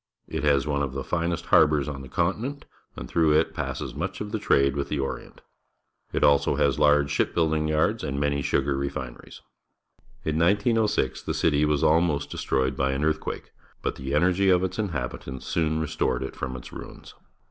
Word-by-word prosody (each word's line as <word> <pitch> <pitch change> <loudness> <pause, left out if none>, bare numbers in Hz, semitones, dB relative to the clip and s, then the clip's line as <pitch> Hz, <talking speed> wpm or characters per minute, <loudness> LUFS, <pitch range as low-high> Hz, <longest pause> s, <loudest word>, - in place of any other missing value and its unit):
It - - -4
has 70 -2 +3
one 70 -1 0
of 70 -2 -2
the 70 -1 -4
finest 85 +1 -2
harbours 75 -2 +4
on 70 -2 -5
the 65 - -10
continent, 105 - -2 0.3
and - - -7
through 80 -2 +3
it 80 +2 +2
passes - - -4
much 90 +5 -4
of 105 0 -5
the 110 - -2
trade 70 -7 +3
with 70 0 -2
the 75 - -1
Orient. 70 - -5 0.7
It - - -1
has - - +7 0.2
also - - +2
large 75 +1 +3
ship - - 0
building 80 -2 +1
j 80 - -1
ards 75 - +1
and 70 0 -2
many 70 0 0
sugar 70 0 0
refineries. 65 -3 -6 0.8
In 80 0 0
1906 105 +5 +2
the - - -3
city 75 -2 +2
was 75 -1 +1
almost 80 -3 +2
destroyed 65 0 0
bj' 65 0 0
an 70 - -2
earthquake, 80 0 -2 0.3
but - - -1
the 65 +2 -3
energy 90 +5 +3
of 90 -1 +4
its 95 +1 -3
inhabitants 65 -8 -4
soon 80 -1 0
restored 75 -5 -1
it 65 - -6
from 65 -1 -4
its - - -10
ruins. - - -10
75 Hz, 190 wpm, -26 LUFS, 70-85 Hz, 0.8 s, has